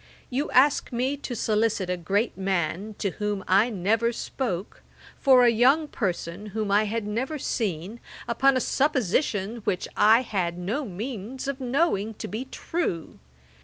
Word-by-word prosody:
You 275 +4 -1
ask 275 +3 +4
me 255 +4 0
to 260 -3 -5
solicit 215 -3 +1
a 180 - 0
great 200 +7 -1
man, 190 +2 -2
to 200 - -1
whom 210 -1 -3
I 200 +6 +4
never 220 +3 +1
spoke, 220 -5 -4 0.4
for 260 -2 +6
a 240 - +6
young 265 +7 +4
person 185 - -3
whom 210 0 -3
I 210 +2 +4
had 220 +1 -2
never 250 +9 -2
seen, 205 - -3 0.3
upon 265 +3 +3
a - - +1
supposition 235 - 0
which 205 -5 -2
I 225 +3 +6
had 180 -7 -2
no 215 +11 -2
means 230 +5 -6
of 275 -1 -3
knowing 250 - 0
to - - -6
be 225 +5 -4
true. 265 - -4
220 Hz, 155 wpm, -26 LUFS, 195-255 Hz, 0.4 s, for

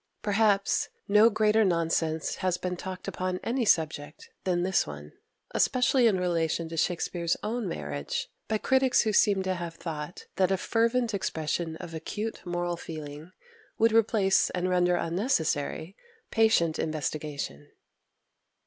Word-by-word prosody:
Perhaps 205 -1 +2 0.2
no 210 +3 +6
greater 215 0 +3
nonsense 165 -3 0
has 185 -1 0
been 180 0 -3
talked 185 +1 -7
upon 185 0 -2
any 240 +1 0
subject 155 -5 0
than 175 -2 +1
this 190 0 +1
one, 75 0 -9 0.4
especially 250 -1 +3
in 195 -4 +2
relation 165 -2 0
to 165 - -6
Shakspere's 170 0 0
own 225 0 -2
marriage, 70 - -4 0.2
by 220 - +1
critics 260 +3 +3
who 215 -2 0
seem 200 -2 +4
to 190 0 0
have 170 -2 -5
thought 160 0 -6
that 185 -1 +3
a 195 - +2
fervent 230 +3 +1
expression 165 -3 -2
of 165 +1 -9
acute 210 +7 -5
moral 175 0 -2
feeling 155 0 -8 0.5
would 225 +1 +4
replace 215 -3 +3
and 180 0 -2
render 180 0 +3
unnecessary 165 - -1 0.4
patient 220 -8 +3
investigation. 150 - -4
180 Hz, 135 wpm, -28 LUFS, 160-210 Hz, 0.5 s, no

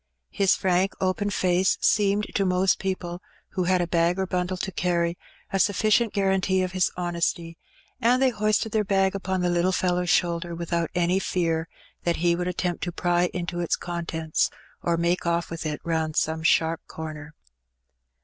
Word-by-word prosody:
His 195 -2 +3
frank 185 +1 +1
open 190 +2 0
face 185 -1 +2
seemed 205 0 +2
to 200 - +1
most 185 0 +2
people, 185 -2 -3 0.3
who 185 -2 -2
had 185 0 +2
a 175 - -1
bag 170 +1 +2
or 190 - 0
bundle 180 0 -2
to 190 - -3
carry, 170 -1 0 0.4
a 195 - +1
sufficient 215 +3 +3
guarantee 190 -1 +1
of 185 - -3
his 185 -1 +1
honesty, 170 -1 -2 0.5
and 245 +3 +4
they 265 -1 +3
hoisted 215 0 0
their 215 -1 +1
bag 195 -1 +2
upon 190 -1 -2
the 180 - +1
little 175 +2 +2
fellow^s 180 -1 0
shoulder 170 -1 +1
without 170 0 -2
any 175 +2 +2
fear 165 -3 -1 0.3
that 170 -1 +1
he 170 +1 +2
would 180 +1 -2
attempt 180 -1 -2
to 175 - -3
pry 175 0 +1
into 175 -1 -4
its 170 - +1
contents, 165 -2 -2 0.3
or 170 -1 0
make 170 +2 +1
oflf 170 -1 -1
with 165 -1 -4
it 150 -1 -3
round 160 -2 -1
some 160 0 0
sharp 165 0 +2
comer. 155 -1 -8
180 Hz, 175 wpm, -25 LUFS, 170-190 Hz, 0.5 s, and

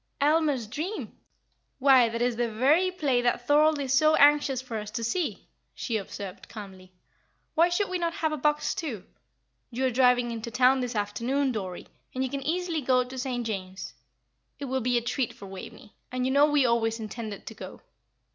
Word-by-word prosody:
"Aylmer's 295 -4 +2
Dream! 310 - -5 0.6
Why, 260 -3 +5
that 230 +1 -2
is 245 -1 +1
the 240 0 0
very 290 +12 +3
play 285 -9 0
that 245 0 0
Thorold 300 +2 +4
is 270 -2 -1
so 310 +3 +5
anxious 290 -2 +4
for 245 -3 -5
us 210 0 -7
to 230 +2 -4
see," 315 +9 -2 0.3
she 235 - -3
observed, 200 -2 -8
calmly. 190 -4 -10 0.6
"Why 335 +2 +4
should 385 +3 0
we 365 -1 -2
not 335 -1 -1
have 315 -1 -1
a 305 - -2
box, 295 +2 +1
too? 245 - -5 0.7
You 255 +2 -2
are 260 - +2
driving 245 -1 +3
into 230 0 -5
town 255 +2 +4
this 250 -2 -3
afternoon, 240 +7 0
Dorrie, 190 -6 -5 0.3
and 260 - 0
you 260 - -3
can 275 - -3
easily 335 +2 -1
go 255 -1 +3
to 250 +1 -10
St. 250 -2 -3
James's. 190 -3 -5 0.6
It 285 - -5
will 265 0 -1
be 245 +1 +1
a 235 - -1
treat 245 +1 -1
for 200 - -12
Waveney 195 +2 -10 0.2
and 255 0 -1
you 260 - +1
know 285 +2 +5
we 290 -3 +3
always 230 -1 +1
intended 215 -1 -6
to - - -7
go." 190 -3 -10
255 Hz, 195 wpm, -27 LUFS, 230-290 Hz, 0.7 s, Why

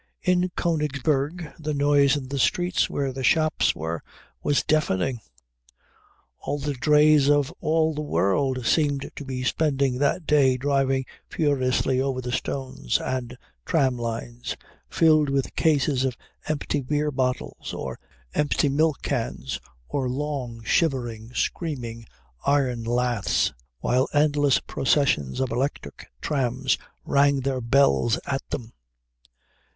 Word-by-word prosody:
In 180 0 +2
Königsberg 150 0 -1
the 155 -1 -3
noise 145 0 +4
in 130 -3 -7
the 140 0 -2
streets 175 +7 +1
where 135 -2 -2
the 130 0 -5
shops 155 +3 +3
were 80 0 -4 0.4
was 145 - +1
deafening. 130 -6 +1 1.2
All 145 - -3
the 145 0 -2
drays 150 +1 +4
of 145 +1 +2
all 160 0 +2
the 150 - -3
world 130 -1 0
seemed 145 0 +1
to - - -6
be 130 -2 -4
spending 135 -2 +1
that 145 +4 +1
day 140 -4 +4
driving 135 -1 +1 0.2
furiously 130 -3 +1
over 135 -1 -1
the 125 -1 -4
stones 130 - -2
and 125 -1 -4 0.3
tram 135 -7 +2
lines 120 0 -5 0.3
filled 155 -3 +4
with 135 -1 -1
cases 145 -4 +2
of 130 -3 -1 0.3
empty 150 -1 -1
beer 150 +3 0
bottles 130 -2 -2
or - - -5 0.3
empty 145 -1 +1
milk 155 +1 +1
cans 65 +1 -3 0.3
or 135 -3 -1
long, 130 -4 -4
shivering, 120 -7 0
screaming 120 -9 -3 0.4
iron 130 -5 +1
laths, 120 -2 +1 0.3
while 125 +2 +2
endless 145 -2 +3
processions 130 - +1
of 130 -2 -1
electric 125 - -3
trams 130 -2 0 0.3
rang 140 0 +3
their 130 -1 -1
bells 120 -1 +3
at 135 -1 -1
them. 120 -4 -5
135 Hz, 125 wpm, -25 LUFS, 125-150 Hz, 1.2 s, noise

